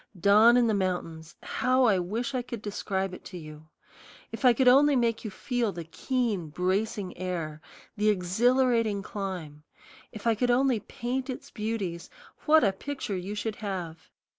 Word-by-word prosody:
Dawn 215 +6 +6
in 245 - +4
the 225 - +2
mountains 175 -4 -3
how 255 0 +1
I 205 -6 +4
wish 225 +9 -3
I 255 - 0
could 235 -3 -7
describe 195 -2 -3
it - - -10
to 180 - -8
you! 155 -1 -11 0.6
If - - -7
I 250 - +8
could 250 +2 +2
only 280 +3 +6
make 235 -3 +1
you 220 - -4
feel 235 +2 -2
the 170 -3 -6
keen, 215 - -2
bracing 190 +3 -1
air, 165 -5 -4 0.3
the 210 0 +2
exhilarating 220 +2 +2
climb; 180 -8 -6 0.5
if 215 0 -10
I 230 - +4
could 245 +3 0
only 250 -1 +3
paint 255 +5 -4
its 255 - -7
beauties, 210 -6 -4 0.4
what 315 +1 +6
a 200 -3 +3
picture 265 0 -5
you 190 +3 -4
should 210 0 -3
have! 180 -6 -6
210 Hz, 165 wpm, -28 LUFS, 180-245 Hz, 0.6 s, I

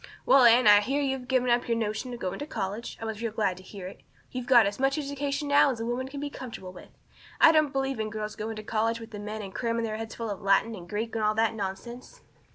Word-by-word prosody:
Well, 270 -2 +6
Anne, 240 +2 +6
I 205 -1 +8
hear 270 +7 -1
you've 265 -2 -2
given 255 -1 +2
up 240 0 +2
your 230 -1 +1
notion 220 +3 -3
of 240 - -7
going 185 -1 -4
to 290 - -5
college. 205 -1 -4
I 225 - -5
was 220 -1 -5
real 230 -2 -2
glad 210 -4 0
to - - -11
hear 190 0 -10
it. 185 - -9 0.3
You've 250 -1 -5
got 240 -4 +7
as 200 +3 -3
much 270 +2 +2
education 285 0 -3
now 285 0 +5
as 250 -4 -3
a 225 - -3
woman 245 +2 -2
can 280 +1 -7
be 290 0 -4
comfortable 225 -10 -8
with. - - -13 0.5
I 325 - +8
don't 310 -3 +3
believe 270 -2 -1
in 215 0 -2
girls 215 0 -5
going 220 +1 -4
to 215 - -7
college 225 +2 0
with 225 0 -10
the 210 - -7
men 210 +1 -5
and 190 -1 -8
cramming 230 -1 -1
their 215 -1 -3
heads 225 0 -6
full 230 -2 -4
of 200 - -6
Latin 195 +3 +2
and 175 -5 -10
Greek 220 +4 -3
and 225 -1 -1
all 215 0 +2
that 225 0 +2
nonsense." 230 - -7
230 Hz, 275 wpm, -27 LUFS, 210-260 Hz, 0.5 s, I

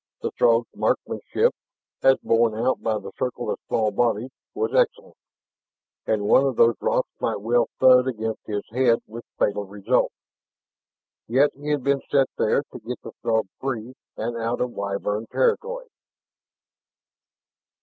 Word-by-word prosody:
The - - -1
Throg's 115 0 +3
marksmanship, - - 0 0.5
as 135 0 +5
borne 115 -1 +3
out 120 +4 0
by 110 -1 0
the 100 -2 -8
circle 125 - -2
of - - -4
small 110 -2 +1
bodies, 120 +3 0 0.2
was 440 +3 -1
excellent. - - +1 0.9
And 110 -2 +1
one 130 - +5
of 135 -3 0
those 115 +1 +5
rocks - - +1
might - - -1
well 120 +3 +2
thud 130 0 +6
against 110 -3 -3
his 105 -1 -2
own 125 - -4
head, 115 -2 +4
with 115 +2 -9
fatal 105 0 +1
results. 100 0 0 1.1
Yet 135 +5 +3
he 145 +2 -11
had 145 -3 0
been 140 0 +1
sent 135 -2 +3
there - - +2
to - - -7
get - - -6
the - - -8
Throg 110 -1 +1
free 125 -2 -4 0.2
and 115 +2 -3
out 115 +1 -2
of 125 - -1
Wyvern 100 +1 -3
territory. - - 0
120 Hz, 150 wpm, -24 LUFS, 110-135 Hz, 1.1 s, thud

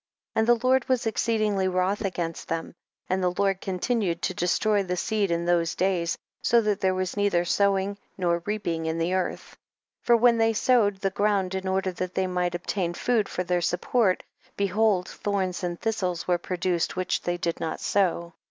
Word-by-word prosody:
5. - - 0
And 220 - +2
the 240 0 +3
Lord 260 0 +3
was 255 -3 +1
exceedingly 215 -3 +1
wroth 185 +3 0
against 170 -4 -3
them, 165 0 -3 0.3
and 190 +1 0
the 180 -1 0
Lord 195 -2 +1
continued 190 -2 -1
to - - 0
destroy 200 +4 +1
the 180 -2 -3
seed 210 0 0
in 170 0 0
those 170 -2 +1
days, 180 -3 0 0.2
so 235 - +4
that 210 -3 0
there 185 -1 +2
was 185 -1 -2
neither 200 -4 +1
sowing 200 +1 +1 0.2
nor 170 -2 +1
reaping 170 -6 -2
in 160 +1 -1
the 165 +2 0
earth. 185 -1 -2
6. - - -19 0.4
For 235 - +4
when 235 0 +4
they 225 0 +3
sowed 220 -3 +3
the 195 - 0
ground 200 -2 +1
in 190 0 -3
order 190 0 0
that 180 0 -5
they 190 - +1
might 180 -1 -1
ob 175 - -6
tain 175 -4 -1
food 230 -2 +1
for 180 - -2
their 180 0 0
support, 185 +4 +1 0.3
behold, 200 -1 +2
thorns 190 -3 -2
and 175 -1 -3
thistles 185 -6 -2
were 175 -1 +2
produced 175 -1 -1
which 185 0 -1
they 175 0 -2
did 170 -1 -2
not 160 - -3
sow. 170 -3 0
185 Hz, 195 wpm, -26 LUFS, 175-205 Hz, 0.4 s, so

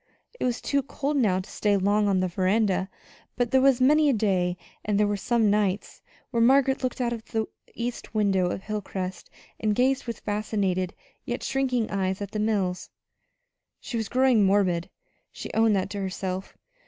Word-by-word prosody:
It - - -1
was 245 -1 -1
too 280 -1 +1
cold 285 +2 -3
now 195 -8 +2
to - - -13
stay 205 -1 +1
long 205 +2 +2
on 190 -2 +2
the 185 - +1
veranda; 190 +1 +1 0.5
but 245 -1 0
there 265 - +4
was 270 -2 +4
many 295 +3 +5
a - - +3
day, 185 -5 +1 0.3
and 210 -1 0
there 210 - +4
were 205 0 0
some 220 0 +2
nights, 205 -2 -1 0.3
when 230 -1 +2
Margaret 265 +2 +4
looked 255 0 -2
out 240 -1 0
of 225 -2 -6
the 220 -1 -2 0.3
east 240 -1 -5
windows 190 -4 +2
of - - -4
Hilcrest 190 -3 -5 0.3
and 215 -1 +1
gazed 260 +2 +1
with 235 - -5
fascinated, 205 -3 -1 0.3
yet 240 +1 -4
shrinking 255 -4 0
eyes 190 -1 -1
at 200 -1 -5
the 215 - -3
mills. 200 -4 -1 0.9
She 245 - -7
was 225 -3 -2
growing 255 -4 +4
morbid 190 -3 +2 0.4
she - - -8
owned 225 -1 +4
that 190 +1 -1
to 205 - -4
herself. 190 0 -4
210 Hz, 180 wpm, -26 LUFS, 190-240 Hz, 0.9 s, many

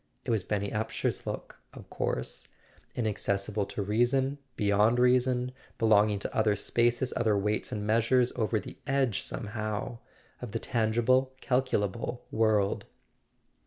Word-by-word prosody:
It - - -1
was 110 -5 +1
Benny 100 +1 -2
Upsher's 110 0 -2
look, - - -6 0.2
of - - -11
course—inaccessible 100 - -2
to 100 - -3
reason, 130 +7 +1 0.2
beyond 105 +2 +3
reason, 125 0 +3 0.3
belong¬ 110 -1 +4
ing - - -1
to 100 - -5
other 110 -2 +3
spaces, 120 +4 +1
other 110 -3 +2
weights 105 +2 -1
and 105 -1 -3
measures, 115 +3 +3
over 110 0 0
the 100 - -10
edge, 135 -7 +1
somehow, 110 0 -4 0.4
of 120 -4 -7
the - - 0
tangible 120 +4 +1
calculable 120 -3 -1
world. 110 -3 +2
110 Hz, 125 wpm, -29 LUFS, 105-125 Hz, 0.4 s, belong¬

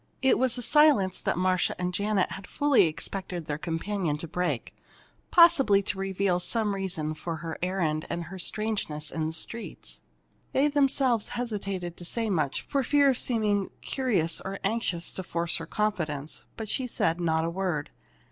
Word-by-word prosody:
It 265 - +4
was 255 -1 +2
a 245 - -3
silence 285 -11 +4
that - - -1
Marcia 185 0 +1
and 180 0 -2
Janet 205 0 +1
had 195 - -7
fully 285 -10 +3
expected 175 +1 -4
their 145 0 -3
companion 165 -1 -2
to 165 - -7
break 155 -7 -2 0.6
possibly 290 - +6
to 195 - -2
reveal 195 -1 0
some 210 +3 0
reason 180 -6 -3
for 165 +2 -5
her 160 0 -5
errand 170 -4 -1
and 170 - -3
her 185 +3 -9
strangeness 180 -8 -2
in 160 -1 -2
the - - -3
streets. 225 +8 -6 0.5
They 280 +3 +3
themselves 270 -5 +2
hesitated 195 -7 -4
to - - -10
say 225 +3 0
much, 155 -6 0
for 280 - 0
fear 285 +1 +4
of 255 - -2
seeming 210 -5 +1
curious 205 - 0
or 195 +1 -5
anxious 195 -5 +1
to - - -4
force 170 -1 0
her 165 - -7
confidence. 160 -9 -2
But 220 - -5
she 255 +4 0
said 170 -7 0
not 160 -1 +1
a - - -1
word. 175 -5 -2
190 Hz, 170 wpm, -27 LUFS, 165-225 Hz, 0.6 s, possibly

